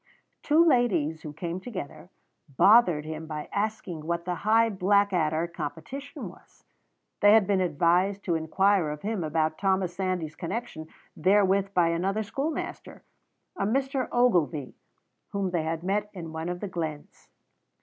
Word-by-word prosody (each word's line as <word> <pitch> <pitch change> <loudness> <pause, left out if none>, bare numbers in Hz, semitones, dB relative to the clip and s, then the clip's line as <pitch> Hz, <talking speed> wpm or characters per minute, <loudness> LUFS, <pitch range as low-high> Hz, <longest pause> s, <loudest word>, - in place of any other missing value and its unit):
Two 315 +3 +4
ladies, 180 - +2
who 150 - -7
came 170 +3 -5
together, 180 - -8 0.5
bothered 195 -8 +5
him 160 0 -6
by 150 -1 -5
asking 205 -6 -3
what 170 0 -2
the 180 -1 -2
Hugh 225 +3 +3
Blackadder 185 -5 +2
competition 170 - -7
was. - - -17 0.6
They 205 +1 +6
had 220 -2 +6
been 195 -1 +1
advised 180 +4 +1
to 175 - 0
inquire 175 +2 +2
of 150 0 -6
him 210 -3 -2
about 155 0 -1
Thomas 190 -2 +1
Sandys's 180 -5 -2
connection 180 -3 -5 0.3
therewith 195 +2 +2
by 170 -2 +4
another 190 +6 -1
schoolmaster, 275 +9 -5 0.5
a - - -2
Mr. 265 +2 -1
Ogilvy, 175 - +1 0.6
whom 195 -2 -1
they 175 -2 0
had 160 +1 -3
met 205 +3 -1
in 165 -3 -7
one 160 +2 -4
of 180 0 -5
the 205 - -3
glens. 160 -5 -6
180 Hz, 145 wpm, -27 LUFS, 160-205 Hz, 0.6 s, They